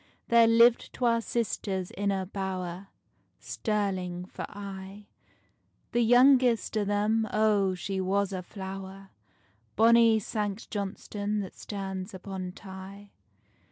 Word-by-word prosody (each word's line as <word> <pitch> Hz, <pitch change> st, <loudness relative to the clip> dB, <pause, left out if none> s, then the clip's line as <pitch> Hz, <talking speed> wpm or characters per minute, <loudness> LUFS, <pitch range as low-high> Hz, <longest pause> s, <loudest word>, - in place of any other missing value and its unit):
There 235 Hz, -1 st, +6 dB
liv'd 230 Hz, +1 st, +5 dB
twa 235 Hz, -2 st, +1 dB
sisters 200 Hz, -5 st, -2 dB
in 200 Hz, 0 st, -2 dB
a 190 Hz, -1 st, -1 dB
bower, 185 Hz, -1 st, -5 dB, 0.5 s
Stirling 190 Hz, -5 st, -2 dB
for -, -, -7 dB
aye: 200 Hz, 0 st, -8 dB, 0.9 s
The 240 Hz, -, +2 dB
youngest 245 Hz, 0 st, +5 dB
o' 215 Hz, -, +2 dB
them, 210 Hz, +2 st, +1 dB
O, 210 Hz, -3 st, +2 dB
she 190 Hz, +1 st, -3 dB
was 195 Hz, +1 st, 0 dB
a 185 Hz, -, -3 dB
flower! 195 Hz, +1 st, -8 dB, 0.6 s
Bonny 230 Hz, 0 st, +6 dB
Sanct 210 Hz, 0 st, -4 dB
Johnstonne 205 Hz, 0 st, -3 dB
that 190 Hz, -, -7 dB
stands 190 Hz, -1 st, -6 dB
upon 185 Hz, -1 st, -6 dB
Tay. 195 Hz, +1 st, -11 dB
200 Hz, 115 wpm, -28 LUFS, 190-220 Hz, 0.9 s, There